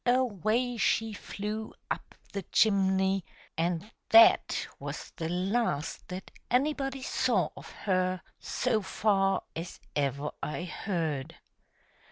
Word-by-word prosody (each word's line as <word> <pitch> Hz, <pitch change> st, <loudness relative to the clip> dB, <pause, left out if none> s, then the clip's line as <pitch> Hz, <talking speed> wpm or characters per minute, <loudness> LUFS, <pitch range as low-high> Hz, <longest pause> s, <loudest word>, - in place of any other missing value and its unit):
— -, -, -52 dB
away 240 Hz, +1 st, 0 dB
she 220 Hz, +1 st, +2 dB
flew 210 Hz, +2 st, -4 dB, 0.2 s
up -, -, -4 dB, 0.2 s
the 200 Hz, -, -2 dB
chimney, 190 Hz, -2 st, +3 dB, 0.3 s
and 170 Hz, +5 st, -1 dB, 0.2 s
that 225 Hz, 0 st, +7 dB
was -, -, -6 dB
the 165 Hz, -2 st, -2 dB
last 185 Hz, -3 st, -1 dB
that 185 Hz, +1 st, -7 dB, 0.2 s
anybody 270 Hz, 0 st, +1 dB
saw -, -, +2 dB
of -, -, -10 dB
her 185 Hz, -2 st, 0 dB, 0.2 s
so 235 Hz, -4 st, 0 dB
far 195 Hz, 0 st, +2 dB
as 165 Hz, +2 st, -6 dB, 0.2 s
ever 140 Hz, +1 st, 0 dB
I 150 Hz, +3 st, -3 dB
heard. 165 Hz, -7 st, -2 dB
195 Hz, 115 wpm, -30 LUFS, 175-220 Hz, 0.3 s, that